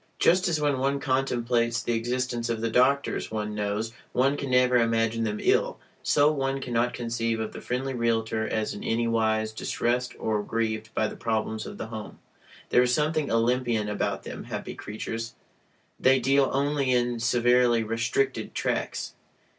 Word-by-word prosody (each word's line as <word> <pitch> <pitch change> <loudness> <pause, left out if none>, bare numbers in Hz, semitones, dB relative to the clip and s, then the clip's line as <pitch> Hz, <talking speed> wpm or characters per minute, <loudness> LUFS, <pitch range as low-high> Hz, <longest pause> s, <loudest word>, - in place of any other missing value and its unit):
Just 180 +2 +4
as 165 -3 +1
when 145 -3 +1
one 140 +1 +1
contemplates 120 -3 0
the 120 - 0
existence 120 0 -1
of 115 -1 -1
the 115 0 -1
doctors 135 +4 +2
one 105 -1 -3
knows, 105 +2 -2 0.2
one 135 +3 +3
can 140 -2 -4
never 125 0 +4
imagine 115 -1 +1
them 105 -1 -2
ill, - - +2 0.2
so 145 +1 +4
one 135 -2 -1
cannot 125 -2 0
conceive 115 -1 -1
of 110 -1 -4
the - - -8
friendly 130 +2 -2
realtor 115 -2 0
as 110 -1 -1
in 105 - -8
any 115 +1 0
wise 110 -1 +1
distressed 120 +3 -1
or 110 -1 0
grieved 110 0 -2
by 110 - +2
the - - -7
problems 110 -1 -2
of - - -8
the - - -4
home. 110 -2 -7 0.5
There 125 - +5
is 125 0 +2
something 155 +2 +1
Olympian 115 -1 +1
about 105 - -2
them, - - -7
happy - - -5
creatures! 115 +2 -6 0.6
They 130 0 +5
deal 135 +2 +3
only 140 -1 +1
in 120 -1 +1
severely 120 0 +3
"restricted" 115 +5 -1
tracts. - - -2
120 Hz, 165 wpm, -27 LUFS, 115-130 Hz, 0.6 s, There